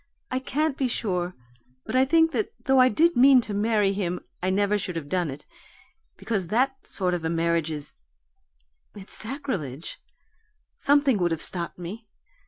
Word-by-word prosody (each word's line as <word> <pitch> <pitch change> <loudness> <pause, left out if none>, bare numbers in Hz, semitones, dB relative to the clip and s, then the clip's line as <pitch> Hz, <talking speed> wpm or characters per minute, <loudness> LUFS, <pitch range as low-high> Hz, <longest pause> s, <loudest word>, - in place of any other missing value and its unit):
I 255 - 0
can't 285 +2 -1
be 265 - +2
sure, 180 -7 -2 0.5
but - - -4
I 260 +1 +5
think 325 +3 +4
that 425 +5 -1
though 265 -1 +4
I 255 0 +7
did 335 +9 +3
mean 265 +1 +7
to 215 - -6
marry 205 -1 +2
him 180 -3 -2 0.2
I 185 - 0
never 205 +2 +1
should 180 -2 -5
have 160 -3 -4
done 175 0 0
it, 140 +2 -8 0.7
because 200 -6 -2
that 265 +7 0
sort 185 -2 -1
of 175 -2 -2
a 160 - -1
marriage 165 -1 0
is 150 -2 -7 1.0
it's 200 -1 -8
sacrilege 215 - -3 0.8
something 280 -5 +3
would 175 -1 +2
have 165 -2 -2
stopped 170 0 -1
me. 200 +6 -8
205 Hz, 170 wpm, -25 LUFS, 175-260 Hz, 1.0 s, I